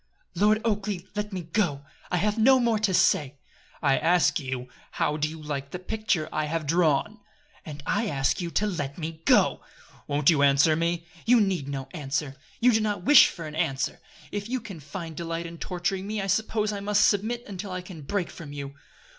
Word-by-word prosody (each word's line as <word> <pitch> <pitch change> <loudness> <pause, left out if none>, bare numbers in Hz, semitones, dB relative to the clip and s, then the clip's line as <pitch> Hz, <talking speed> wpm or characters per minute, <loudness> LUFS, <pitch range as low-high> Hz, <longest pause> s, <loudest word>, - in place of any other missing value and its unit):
"Lord 215 +1 +3
Oakleigh! 205 -4 -1
Let 210 0 -3
me 185 -2 -4
go! 160 -5 -1 0.2
I 180 - 0
have 210 +4 +1
no 255 +4 +5
more 230 -3 +2
to 215 -2 +1
say." 150 -6 +2 0.5
"I 140 -2 +3
ask 175 +1 +3
you, 130 -3 -4 0.3
how 150 - 0
do 155 0 0
you 160 +1 -9
like 140 -2 -5
the 180 - -5
picture 185 -4 -1
I 155 0 0
have 160 +1 -2
drawn?" 170 +6 +1 0.5
"And 150 -2 -8
I 220 +2 0
ask 135 -1 0
you 170 - -3
to 205 - 0
let 145 -9 -3
me 160 -1 -6
go." - - +4 0.5
"Won't 145 +2 +3
you 150 -3 +2
answer 140 +3 +5
me?" 170 +1 -1 0.2
"You 245 0 +6
need 190 -9 0
no 135 -2 -4
answer. 145 -3 -3 0.2
You 250 +1 +5
do 220 -1 +2
not 205 -4 -1
wish 290 +6 +8
for 165 - -7
an 155 - -7
answer. 135 -3 -1 0.3
If 205 +1 -4
you 255 +1 -1
can 200 -8 -9
find 155 +3 -7
delight 165 0 -4
in 170 0 -8
torturing 190 +2 -2
me 215 0 -2
I 195 - -2
suppose 215 +1 0
I 200 - -4
must 205 +1 +3
submit 225 +4 0
until 200 0 -6
I 185 0 -3
can 180 -3 -10
break 180 +4 -2
from 155 -4 -10
you." 140 -1 -6
175 Hz, 205 wpm, -26 LUFS, 150-210 Hz, 0.5 s, wish